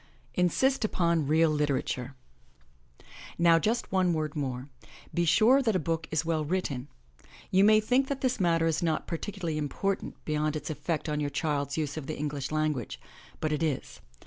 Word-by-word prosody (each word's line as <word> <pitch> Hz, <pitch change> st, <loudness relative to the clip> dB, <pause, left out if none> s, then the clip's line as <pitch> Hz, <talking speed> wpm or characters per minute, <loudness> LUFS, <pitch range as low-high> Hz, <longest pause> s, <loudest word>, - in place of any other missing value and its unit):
INSIST 255 Hz, +10 st, +2 dB
UPON 170 Hz, -7 st, +1 dB
REAL 160 Hz, +1 st, +4 dB
LITERATURE 140 Hz, -3 st, -1 dB, 1.2 s
OW 170 Hz, -1 st, +6 dB
just 230 Hz, +7 st, -1 dB
one 185 Hz, -2 st, +2 dB
word 155 Hz, -2 st, -2 dB
more. 130 Hz, -3 st, -3 dB, 0.5 s
Be 175 Hz, 0 st, +1 dB
sure 225 Hz, -, +5 dB
that 225 Hz, -6 st, +1 dB
a -, -, +3 dB
book 165 Hz, +1 st, -2 dB
is 155 Hz, 0 st, 0 dB
well 160 Hz, -2 st, 0 dB
written. 145 Hz, -6 st, -2 dB, 0.6 s
You 190 Hz, +1 st, +5 dB
may 215 Hz, +1 st, +6 dB
think 250 Hz, +5 st, +2 dB
this 265 Hz, -2 st, -1 dB
matter 165 Hz, -3 st, +2 dB
is 160 Hz, -1 st, +1 dB
not 160 Hz, -2 st, 0 dB
particularly 170 Hz, -2 st, -3 dB
important 190 Hz, +7 st, -2 dB
beyond 155 Hz, 0 st, 0 dB
its 155 Hz, -, -4 dB
effect 155 Hz, 0 st, -3 dB
on 150 Hz, -1 st, -1 dB
your 145 Hz, -1 st, -1 dB
child's 145 Hz, -1 st, -1 dB
use 150 Hz, -1 st, -2 dB
of 145 Hz, -3 st, -5 dB
the 155 Hz, -, -4 dB
English 145 Hz, -2 st, -3 dB
language, 155 Hz, -5 st, -1 dB, 0.4 s
but 155 Hz, -1 st, -1 dB
it 150 Hz, -, -2 dB
is. 145 Hz, -, -2 dB
160 Hz, 170 wpm, -29 LUFS, 150-185 Hz, 1.2 s, OW